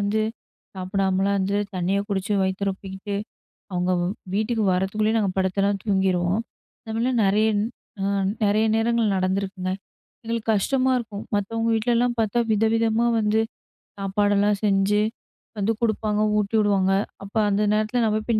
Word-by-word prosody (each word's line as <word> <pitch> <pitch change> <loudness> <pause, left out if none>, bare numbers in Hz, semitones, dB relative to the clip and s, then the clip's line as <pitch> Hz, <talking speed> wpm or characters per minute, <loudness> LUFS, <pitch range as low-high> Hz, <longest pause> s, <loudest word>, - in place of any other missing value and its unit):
வந்து, 205 +2 +1 0.5
சாப்புடாமலாம் 190 +1 0
இருந்து, 195 +1 0 0.2
தண்ணிய 185 +2 0
குடிச்சு, 200 0 -1
வயித்த 190 +1 -1
ரொப்பிக்கிட்டு, 195 +1 -6 0.6
அவுங்க 180 0 0
வ 175 - 0 0.3
வீட்டுக்கு 220 +1 0
வரதுக்குள்ளயே 210 +4 +1
நாங்க 195 -3 0
படுத்தலாம் 195 +1 +1
தூங்கிருவோம். 190 -1 +1 0.4
இந்த 220 - -5
மாரி 250 +2 +1
நெறைய 210 +3 +3 0.5
அ - - 0 0.4
நெறைய 215 +2 +3
நேரங்கள்ல 225 -2 +2
நடந்துருக்குங்க. 190 0 -1 0.5
எங்களுக்கு 230 0 -2
கஷ்டமா 260 +5 +1
இருக்கும். 215 -3 -6
மத்தவங்க 225 +3 -1
வீட்லலாம் 240 +2 +1
பாத்தா 220 +1 0
வித 215 +1 +2
விதமா 230 +1 +2
வந்து, 215 +1 +2 0.6
சாப்பாடெல்லாம் 205 +1 +2
செஞ்சு 200 +1 +3 0.6
வந்து 205 +3 +1
குடுப்பாங்க. 215 -2 0 0.2
ஊட்டி 210 +2 -1
விடுவாங்க. 195 -2 +2 0.3
அப்ப 200 +3 -11
அந்த 205 +1 +1
நேரத்துல, 215 +3 +1
நான் 215 -1 +1
போய் 230 -2 +2
205 Hz, 135 wpm, -24 LUFS, 195-220 Hz, 0.6 s, நெறைய